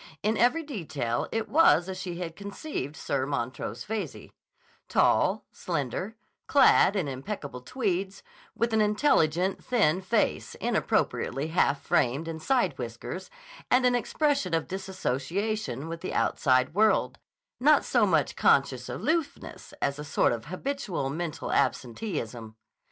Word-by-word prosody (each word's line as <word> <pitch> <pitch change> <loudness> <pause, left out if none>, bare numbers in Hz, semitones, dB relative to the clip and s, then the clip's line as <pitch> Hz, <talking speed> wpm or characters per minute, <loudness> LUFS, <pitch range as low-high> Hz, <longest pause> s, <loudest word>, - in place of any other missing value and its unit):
In 215 +2 +2
every 250 +9 +3
detail 150 - -3
it 225 0 -2
was 275 - +5
as 190 - -4
she 180 -2 -5
had 170 -2 -5
conceived 200 - -5
Sir 135 -1 -1
Montrose 120 -4 -3
Veyze: 220 0 -5 0.6
tall, - - +3
slender, 170 - -3 0.3
clad 275 -7 +5
in 185 -7 0
impeccable 140 -1 -6
tweeds, 195 - -2 0.3
with 230 0 0
an 220 - +4
intelligent, 195 - +2
thin 190 -8 +2
face 185 - 0
inappropriately 140 +4 0
half 145 -4 +1
framed 135 +7 +1
in 160 -1 -5
side 190 - +1
whiskers, 120 +10 -6 0.4
and 250 0 +4
an 250 - +4
expression 260 - +1
of 165 - -1
dissociation 190 - -3
with 165 0 -6
the - - -4
outside 130 +1 +2
world; 215 +3 +2 0.4
not 300 +4 +5
so - - +3
much - - +1
conscious - - +2
aloofness 320 -2 -3
as 140 +1 0
a - - -4
sort 145 - +2
of 115 -1 -4
habitual 185 - -3
mental 165 +1 -4
absenteeism. 120 - -2
175 Hz, 130 wpm, -28 LUFS, 140-220 Hz, 0.6 s, was